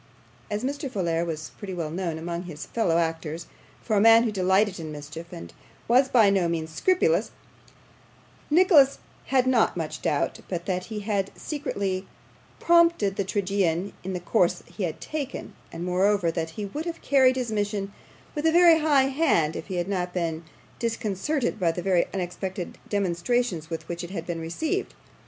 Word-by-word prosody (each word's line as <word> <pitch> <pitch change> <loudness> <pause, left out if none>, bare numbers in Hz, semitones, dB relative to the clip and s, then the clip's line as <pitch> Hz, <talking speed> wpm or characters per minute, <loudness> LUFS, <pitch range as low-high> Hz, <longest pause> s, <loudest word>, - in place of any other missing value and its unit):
As 210 +2 -2
Mr. 280 +1 -3
Folair 170 -7 0
was 155 -2 -5
pretty 195 -3 -5
well 160 -3 -3
known 170 -2 -3
among 170 +2 -4
his 160 -3 -7
fellow 195 -8 +1
actors 165 0 -2 0.4
for 220 - 0
a 200 - +4
man 225 +1 +7
who 230 - 0
delighted 190 0 +2
in 160 -2 -6
mischief, 150 +3 -8
and 85 0 -9 0.3
was 255 +3 +5
by 220 -5 +5
no 190 -3 +2
means 160 -1 -3
scrupulous, 215 - +2 1.2
Nicholas 300 -4 +6 0.3
had 260 -2 +3
not 250 -7 +3
much 160 -2 -4
doubt 145 - 0
but 175 -2 -3
that 185 -1 -2
he 215 -2 -5
had 200 -2 -1
secretly 200 -11 -3 0.5
prompted 335 - +4
the 200 - 0
tragedian 195 -2 0
in 190 +1 -4
the 180 - -2
course 180 -1 +1
he 200 - -4
had 160 - -5
taken, 295 -4 -5 0.2
and, 170 - -5
moreover, 185 0 +2
that 165 -1 -3
he 210 - -3
would 295 +11 -5
have 335 -1 -5
carried 260 -2 +4
his 250 -3 -2
mission 205 -1 -2 0.4
with 300 +1 0
a - - +4
very 340 -1 +7
high 290 -4 +4
hand 265 - +2
if - - -6
he 190 - -4
had 175 0 -1
not 180 -2 -2
been 165 -2 -2 0.4
disconcerted 230 +3 -1
by 170 -3 +2
the 175 +1 -5
very 185 -3 +2
unexpected 185 0 -4
demonstrations 190 -1 0
with 165 -1 -5
which 170 0 -4
it 175 - -6
had 170 -3 -5
been 170 -2 -4
received. 315 - -2
195 Hz, 175 wpm, -26 LUFS, 170-240 Hz, 1.2 s, man